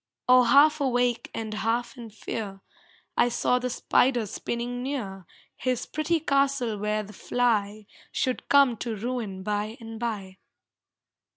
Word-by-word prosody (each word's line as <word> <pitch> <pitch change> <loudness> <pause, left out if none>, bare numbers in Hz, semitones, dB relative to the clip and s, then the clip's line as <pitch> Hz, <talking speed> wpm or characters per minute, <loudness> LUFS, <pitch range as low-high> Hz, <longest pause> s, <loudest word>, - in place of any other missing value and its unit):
Or 250 -1 +6
half 295 +4 +6
awake, 245 -3 +1
and 220 -1 -4
half 230 +4 -1
in 235 -3 -9
fear, 205 -2 -6 0.5
I 245 - +4
saw 250 +1 +1
the 250 0 -2
spider 245 -1 +2
spinning 240 +4 -4
near 205 - -4 0.3
His 255 -2 -1
pretty 310 +2 0
castle 275 -7 +1
where 210 +1 -1
the 210 +1 -12
fly 215 -2 0 0.3
Should 255 -1 -2
come 275 -5 +5
to 230 0 -3
ruin 215 -4 -4
by 210 +3 -2
and 225 -1 -8
by. 200 -5 -4
235 Hz, 135 wpm, -27 LUFS, 215-255 Hz, 0.5 s, Or